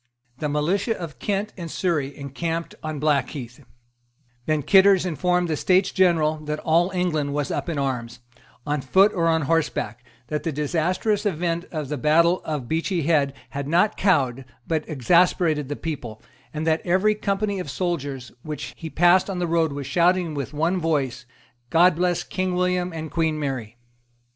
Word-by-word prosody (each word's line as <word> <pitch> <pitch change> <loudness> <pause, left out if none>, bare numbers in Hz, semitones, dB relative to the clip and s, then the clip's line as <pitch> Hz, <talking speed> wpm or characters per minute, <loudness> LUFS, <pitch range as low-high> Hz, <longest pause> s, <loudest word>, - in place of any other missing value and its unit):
The 150 - -1
militia 180 +10 0
of 155 -8 -7
Kent 205 - -2
and 170 -2 -6
Surrey 150 -6 -1
encamped 165 +4 -4
on 155 -1 -4
Blackheath, 140 -3 -1 0.8
Van 155 -2 +1
Citters 190 +2 +5
informed 180 +2 +1
the 160 - 0
States 185 +5 +2
General 165 -5 +3
that 150 0 -4
all 170 +3 +3
England 160 -6 -1
was 145 -2 -1
up - - -3
in 160 - -2
arms, 125 -4 -3 0.5
on 145 -1 -1
foot 190 +10 +4
or 170 -3 +1
on 160 -1 +2
horseback, 145 -7 -1 0.2
that 150 +3 -3
the 165 - -2
disastrous 175 +8 0
event 170 -3 -1
of 155 -4 -5
the 150 - -3
battle 170 +6 +3
of 150 -6 -3
Beachy 165 +3 -1
Head 145 -3 +2 0.2
had 140 0 -4
not 175 +7 +3
cowed, 135 - +1 0.2
but 160 -1 -2
exasperated 155 - +2
the 145 - -2
people, 125 -10 -6 0.3
and 155 0 -4
that 160 0 +2
every 190 +4 +3
company 205 -1 -1
of 180 - -5
soldiers 140 -7 -3
which 150 0 -6
he 165 - -7
passed 175 +4 +4
on 190 - -3
the 180 - 0
road 165 -2 +1
was 140 -1 -5
shouting 175 +3 +2
with 140 -3 -4
one 165 +5 0
voice, 135 -7 -1 0.4
"God 170 +4 +5
bless 175 0 0
King 185 -1 -2
William 180 0 0
and 160 -2 -6
Queen 160 -1 0
Mary." 125 -6 -4
160 Hz, 170 wpm, -23 LUFS, 145-180 Hz, 0.8 s, Citters